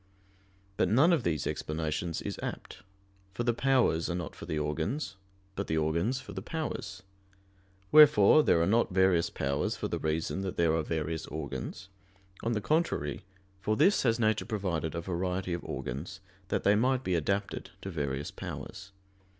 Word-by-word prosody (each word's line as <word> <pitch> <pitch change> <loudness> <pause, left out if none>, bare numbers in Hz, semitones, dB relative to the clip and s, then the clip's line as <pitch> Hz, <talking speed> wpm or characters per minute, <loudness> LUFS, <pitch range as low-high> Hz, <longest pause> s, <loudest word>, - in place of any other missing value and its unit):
But - - +2
none 145 - +5
of 160 - +2
these 80 -8 -1
explanations 80 +2 -2
is - - -5
apt. - - -6 0.6
For 120 - -1
the 120 0 +2
powers 120 -11 +2
are 85 - -1
not 90 -3 -5
for - - -9
the 80 - -2
organs, 80 - -2 0.4
but 100 - -3
the 80 - 0
organs 85 +11 +1
for - - -10
the - - -5
powers; 100 - -5 0.9
wherefore 150 -3 +8
there 85 - +3
are - - +3
not 115 +2 +2
various 90 -2 +3
powers 70 0 -1
for - - -2
the - - -2
reason 80 +4 -1
that 95 -2 -4
there 85 -2 +3
are 80 - +2
various 80 0 -3
organs; 75 +4 -5 0.5
on 115 - 0
the 105 - -1
contrary, 105 - 0 0.4
for 110 +2 0
this 190 +7 +4
has 115 -2 +2
nature 110 -2 +2
provided 90 -7 -2
a 85 - -2
variety 90 +1 -2
of 85 - -4
organs, 75 +10 -5 0.3
that - - -1
they 100 - +5
might 130 +4 +2
be 95 - -1
adapted 100 +5 -1
to 95 - -5
various 70 -3 -3
powers. 95 +1 -8
95 Hz, 170 wpm, -30 LUFS, 80-115 Hz, 0.9 s, wherefore